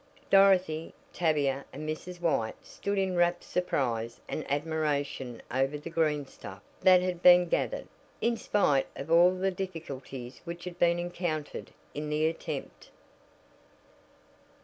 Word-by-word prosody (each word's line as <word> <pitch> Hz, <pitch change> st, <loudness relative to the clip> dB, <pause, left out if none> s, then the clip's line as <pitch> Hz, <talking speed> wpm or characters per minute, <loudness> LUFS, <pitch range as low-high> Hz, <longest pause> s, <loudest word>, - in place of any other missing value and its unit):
Dorothy, 185 Hz, -5 st, +4 dB, 0.2 s
Tavia 145 Hz, -5 st, +1 dB
and 150 Hz, +3 st, -7 dB
Mrs. 175 Hz, +3 st, -5 dB
White 155 Hz, -10 st, 0 dB
stood 200 Hz, 0 st, -3 dB
in 190 Hz, -1 st, +1 dB
rapt 175 Hz, 0 st, +2 dB
surprise 120 Hz, -10 st, -1 dB
and 155 Hz, -, -5 dB
admiration 145 Hz, -5 st, -2 dB
over 135 Hz, +3 st, +1 dB
the 155 Hz, +3 st, -8 dB
"greenstuff" 150 Hz, -11 st, -2 dB, 0.2 s
that 185 Hz, -1 st, +6 dB
had 180 Hz, -2 st, -2 dB
been 180 Hz, 0 st, +7 dB
gathered, -, -, -1 dB, 0.3 s
in 235 Hz, 0 st, +1 dB
spite 150 Hz, -12 st, +2 dB
of 140 Hz, +4 st, -6 dB
all 170 Hz, +2 st, +7 dB
the 185 Hz, +1 st, 0 dB
difficulties 140 Hz, -9 st, -7 dB
which 170 Hz, 0 st, -7 dB
had 180 Hz, -1 st, -7 dB
been 170 Hz, 0 st, +4 dB
encountered 175 Hz, -3 st, -3 dB, 0.2 s
in 150 Hz, +1 st, -4 dB
the 150 Hz, +1 st, +1 dB
attempt. 160 Hz, +1 st, -4 dB
165 Hz, 125 wpm, -29 LUFS, 145-180 Hz, 0.3 s, been